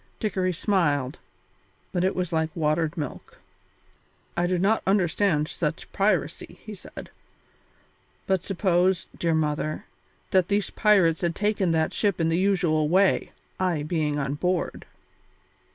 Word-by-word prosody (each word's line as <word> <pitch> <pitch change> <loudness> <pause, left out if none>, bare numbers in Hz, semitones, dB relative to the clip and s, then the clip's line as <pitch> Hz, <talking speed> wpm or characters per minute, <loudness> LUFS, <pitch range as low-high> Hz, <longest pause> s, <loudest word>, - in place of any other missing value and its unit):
Dickory 190 -3 0
smiled, 155 - 0 0.7
but 180 -2 0
it 190 - +1
was 180 -2 -2
like 160 -1 +1
watered 160 +1 0
milk. 145 -4 -6 1.0
"I 175 0 +1
do 180 0 +1
not 200 +5 +2
understand 180 -4 +2
such - - -4
piracy," - - 0
he - - -8
said, - - -11 1.1
"but 190 -2 +1
supposed, 185 -1 +1
dear 165 -1 +1
mother, 155 0 -1 0.5
that 185 -2 +3
these 205 0 0
pirates 190 -7 +3
had 170 -2 0
taken 205 -3 0
that 160 -1 +1
ship 200 -4 0
in 165 -1 +2
the 165 +2 +1
usual 175 -6 +2
way, 190 +3 +3 0.3
I 175 -5 0
being 150 -2 -1
on 140 -1 -1
board." 180 +4 -2
175 Hz, 135 wpm, -25 LUFS, 155-190 Hz, 1.1 s, that